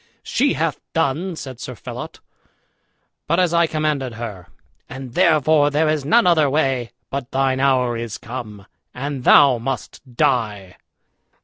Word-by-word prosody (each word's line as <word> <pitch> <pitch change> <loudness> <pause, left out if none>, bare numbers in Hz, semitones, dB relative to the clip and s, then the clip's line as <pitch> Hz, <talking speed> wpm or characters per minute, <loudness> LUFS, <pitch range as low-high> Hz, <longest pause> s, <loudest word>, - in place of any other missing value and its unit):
"She 280 +2 +1
hath 160 -2 -1
done," 165 +4 -1
said 130 -5 -8
Sir 125 - -7
Phelot, - - -8 1.1
"but 170 +4 +2
as 180 -2 +2
I 170 0 +4
commanded 150 -6 -2
her; 105 -6 -7 0.4
and 130 -2 -8
therefore 155 -3 +4
there 150 +2 +1
is 155 -2 0
none 230 +11 +4
other 160 -5 +4
way 135 -5 0 0.2
but 140 -2 -4
thine 135 -1 0
hour 130 -3 +2
is 115 -2 -5
come, 110 -5 -8 0.3
and 135 0 -4
thou 135 -4 +6
must 125 0 -5
die." 105 -8 0
135 Hz, 140 wpm, -20 LUFS, 120-155 Hz, 1.1 s, thou